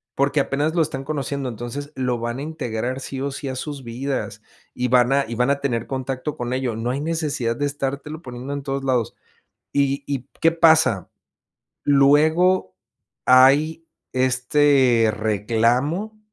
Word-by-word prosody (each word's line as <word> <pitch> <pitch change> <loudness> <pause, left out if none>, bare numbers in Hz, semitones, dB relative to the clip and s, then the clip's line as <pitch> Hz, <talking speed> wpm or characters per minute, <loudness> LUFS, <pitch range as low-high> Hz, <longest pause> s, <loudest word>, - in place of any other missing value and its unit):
porque, 140 +2 +1
apenas 145 +3 0
lo 170 - +3
están 135 -3 -2
conociendo, 140 -2 -3
entonces, 120 +5 -6
lo 125 -2 -1
van 120 +2 -3
a - - -5
integrar 130 -5 -3
sí 135 0 -6
o 140 - -1
sí 140 +1 -6
a 130 - -4
sus 140 +1 -6
vidas 130 +4 -4 0.3
y 125 - -1
van 125 +1 +4
a 140 0 +2
y 115 - -5
van 125 +3 +1
a 140 - 0
tener 120 -5 -1
contacto 130 +2 -4
con 120 0 -3
ello, 130 -3 -1
no 115 +2 -3
hay 135 +2 -3
necesidad 150 -7 -1
de 145 - -1
estártelo 145 +2 -4
poniendo 125 0 -7
en 140 -1 -5
todos 135 0 -3
lados, 125 -5 0 0.6
y 140 0 +1
y, 135 -3 -3
¿qué 165 - +5
pasa? 160 - +3 0.7
Luego 145 - +3 0.5
hay 140 +6 +5 0.3
este 130 -2 +3
reclamo 120 - 0
135 Hz, 160 wpm, -22 LUFS, 125-145 Hz, 0.7 s, qué